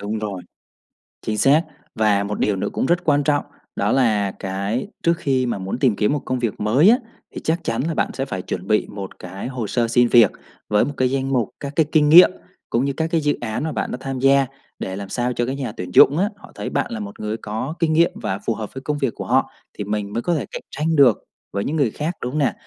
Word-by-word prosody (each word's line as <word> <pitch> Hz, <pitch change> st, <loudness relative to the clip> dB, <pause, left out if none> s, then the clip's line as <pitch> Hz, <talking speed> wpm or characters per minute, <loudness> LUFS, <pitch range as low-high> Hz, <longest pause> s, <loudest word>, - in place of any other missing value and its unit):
đúng 105 Hz, +2 st, -3 dB
rồi. 100 Hz, -4 st, -4 dB, 0.8 s
Chính 110 Hz, -1 st, -2 dB
xác 145 Hz, +6 st, +5 dB, 0.3 s
và 105 Hz, -2 st, +2 dB
một 105 Hz, +1 st, -4 dB
điều 105 Hz, -, +1 dB
nữa 95 Hz, -, -2 dB
cũng -, -, 0 dB
rất 175 Hz, +3 st, +1 dB
quan 145 Hz, -2 st, +3 dB
trọng 145 Hz, 0 st, +1 dB, 0.3 s
đó -, -, 0 dB
là 105 Hz, -6 st, +2 dB
cái 100 Hz, +6 st, -3 dB, 0.2 s
trước 170 Hz, -, +4 dB
khi 135 Hz, -5 st, 0 dB
mà 120 Hz, -4 st, -1 dB
muốn 95 Hz, +5 st, -4 dB
tìm 130 Hz, -6 st, +3 dB
kiếm 105 Hz, +6 st, +1 dB
một 145 Hz, -, -1 dB
công 130 Hz, 0 st, -1 dB
việc 115 Hz, -3 st, -2 dB
mới 130 Hz, -, +4 dB
á 240 Hz, -, +6 dB, 0.4 s
thì -, -, -5 dB
chắc 165 Hz, +2 st, 0 dB
chắn 115 Hz, +1 st, -1 dB
là 165 Hz, -, -1 dB
bạn -, -, 0 dB
sẽ 135 Hz, -, -2 dB
phải 95 Hz, -9 st, -4 dB
chuẩn 90 Hz, 0 st, -5 dB
bị 105 Hz, -1 st, +2 dB
một 100 Hz, -2 st, -8 dB
cái 95 Hz, +4 st, -7 dB
hồ 125 Hz, -4 st, -4 dB
sơ 120 Hz, +2 st, 0 dB
xin 120 Hz, +1 st, +4 dB
việc 115 Hz, -4 st, +6 dB, 0.4 s
với 105 Hz, 0 st, +3 dB
một 145 Hz, -, -4 dB
cái 130 Hz, 0 st, +2 dB
danh 135 Hz, 0 st, -1 dB
mục 120 Hz, -5 st, +1 dB
các 140 Hz, 0 st, -6 dB
cái 160 Hz, -, +4 dB
kinh 150 Hz, -2 st, +4 dB
nghiệm 175 Hz, +4 st, +9 dB, 0.4 s
cũng 120 Hz, +4 st, +1 dB
như 140 Hz, -, -1 dB
các 160 Hz, +4 st, -1 dB
cái 165 Hz, -, +2 dB
dự 145 Hz, 0 st, +1 dB
án 120 Hz, +2 st, -3 dB
mà 160 Hz, -, -2 dB
bạn -, -, -3 dB
đã -, -, -3 dB
tham 135 Hz, -1 st, -4 dB
gia 135 Hz, +1 st, +4 dB, 0.3 s
để 95 Hz, -, -4 dB
làm 100 Hz, 0 st, -6 dB
sao 125 Hz, +2 st, -1 dB
cho 120 Hz, -, -1 dB
cái 130 Hz, +2 st, -3 dB
nhà 135 Hz, -5 st, -4 dB
tuyển 90 Hz, 0 st, -5 dB
dụng 145 Hz, -, +7 dB
á, 200 Hz, +4 st, +2 dB
họ -, -, -15 dB
thấy -, -, -4 dB
bạn -, -, -1 dB
là 230 Hz, -, -4 dB
một 205 Hz, 0 st, -8 dB
người 105 Hz, +1 st, -3 dB
có 110 Hz, +9 st, -4 dB
kinh 160 Hz, -2 st, +2 dB
nghiệm 170 Hz, +2 st, +4 dB
và 100 Hz, -3 st, -3 dB
phù 115 Hz, -, +1 dB
hợp 110 Hz, -2 st, -6 dB
với 130 Hz, -, -6 dB
công 150 Hz, +2 st, -2 dB
việc 135 Hz, -5 st, -1 dB
của -, -, -6 dB
họ -, -, +2 dB, 0.2 s
thì -, -, -5 dB
mình 105 Hz, 0 st, -3 dB
mới 115 Hz, -, -1 dB
có 175 Hz, -, 0 dB
thể 135 Hz, -, -2 dB
cạnh -, -, -6 dB
tranh 160 Hz, +3 st, -1 dB
được 135 Hz, -7 st, +5 dB, 0.3 s
với 100 Hz, +1 st, -1 dB
những 150 Hz, -, -2 dB
người 140 Hz, -8 st, +2 dB
khác, 155 Hz, +8 st, -3 dB
đúng 125 Hz, -, -3 dB
không 150 Hz, -, -2 dB
nè? 140 Hz, -, +2 dB
125 Hz, 270 wpm, -21 LUFS, 105-145 Hz, 0.8 s, nghiệm